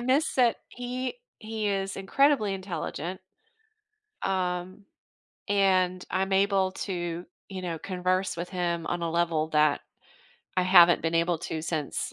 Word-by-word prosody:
miss 260 +6 +1
that 245 -3 +4
he 250 - -4 0.2
he 215 -1 -4
is 195 -1 -2
incredibly 215 +1 +2
intelligent 185 -2 -5 1.0
um, 185 +1 -2 0.6
and 185 -2 +2
I'm 190 +1 0
able 195 -1 +3
to, 175 -3 -4 0.2
you 190 -2 -6
know, 170 -3 -3
converse 185 0 -1
with 170 +1 -4
him 175 -3 -2
on 175 -1 -2
a 165 - -1
level 165 -2 +1
that 150 -2 +3 0.8
I 185 - +4
haven't 175 -2 +7
been 165 0 -1
able 170 0 +2
to 160 -1 -4
since 155 -3 -3
185 Hz, 135 wpm, -27 LUFS, 170-195 Hz, 1.0 s, haven't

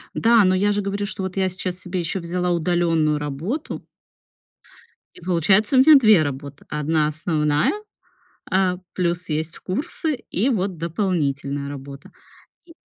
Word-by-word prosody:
Да, 230 -1 +5
но 185 -1 +3
я 205 +2 +2
же 205 0 0
говорю, 200 +1 -2
что 195 -1 -5
вот 190 0 -5
я 190 -1 +2
сейчас 185 0 -4
себе 185 0 -4
ещё 170 +2 -2
взяла 180 +1 -2
удалённую 165 -3 +1
работу 150 - -4 1.3
И - - -15
получается, 190 - +2
у - - +6
меня 300 +4 +8
2 215 - +6
работы: 140 0 -6
одна 150 +1 0
основная, 150 -1 0 0.8
а 185 -1 +2 0.2
плюс 175 -1 -1
есть 155 +2 -3
курсы, 305 - -3 0.2
и 225 +9 +1
вот 195 -6 -1
дополнительная 150 -5 -2
работа, 140 0 -9 0.5
и 335 -1 -17
175 Hz, 145 wpm, -22 LUFS, 155-195 Hz, 1.3 s, меня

